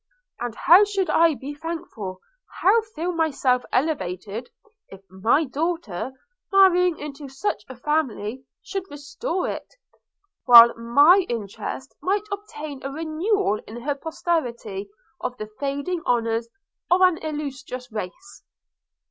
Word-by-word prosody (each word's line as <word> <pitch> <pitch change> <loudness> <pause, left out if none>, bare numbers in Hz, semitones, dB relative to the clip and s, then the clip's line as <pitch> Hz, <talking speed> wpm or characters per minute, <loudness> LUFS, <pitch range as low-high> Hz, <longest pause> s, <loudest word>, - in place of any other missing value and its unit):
And 240 -1 -4
how 360 +10 +7
should 400 -2 0
I 330 -2 +4
be 275 +2 -7
thankful, 290 - -6 0.4
how 425 +5 +5
feel 340 +3 -1
myself 285 -7 +1
elevated, 225 - -2 0.4
if 195 - -12
my 220 +11 +2
daughter, 290 - -3 0.4
marrying 360 -3 +5
into 290 -1 -8
such 210 -6 -3
a 260 - -8
family, 260 -4 -2 0.2
should 385 -1 -5
restore 295 - -4
it, - - -6 0.7
while 235 -1 +10
my 285 +12 +5
interest 235 +4 -5
might 400 +2 0
obtain 310 -9 -7
a 275 - -4
renewal 320 - 0
in 230 +2 -8
her 290 +1 0
posterity 250 - -3 0.3
of 250 0 -4
the 215 -1 -7
fading 285 +5 -2
honours 230 -1 +1 0.4
of 360 +1 +4
an 365 -3 +5
illustrious 270 -5 -6
race!' 215 - -7
285 Hz, 120 wpm, -24 LUFS, 235-335 Hz, 0.7 s, while